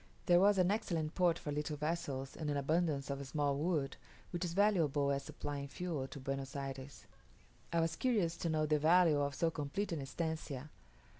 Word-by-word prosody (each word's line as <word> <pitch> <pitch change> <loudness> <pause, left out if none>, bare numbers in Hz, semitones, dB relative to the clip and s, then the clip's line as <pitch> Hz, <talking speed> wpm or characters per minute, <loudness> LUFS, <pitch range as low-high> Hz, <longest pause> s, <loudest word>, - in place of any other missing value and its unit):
There 175 0 +6
was 200 +1 +5
an 185 0 +4
excellent 170 -8 -1
port 175 -3 +3
for 145 - -5
little 150 +1 -2
vessels, 145 -4 -2
and 155 -2 -3
an 145 - 0
abundance 145 -1 +1
of 140 0 -3
small 145 0 0
wood, 150 -2 0 0.3
which 175 0 -2
is 170 -2 -2
valuable 165 -8 +3
as 140 0 0
supplying 145 -1 -5
fuel 155 -3 -3
to 140 - -8
Buenos 135 0 -4
Ayres. 135 0 -6 0.7
I 170 0 +2
was 165 0 0
curious 205 -10 +1
to 170 - -2
know 155 -1 +2
the 150 0 +2
value 165 -1 +5
of 140 -1 -1
so 165 +2 +1
complete 160 +7 -3
an 160 -4 -2
estancia. 150 -1 -4
155 Hz, 190 wpm, -35 LUFS, 140-170 Hz, 0.7 s, There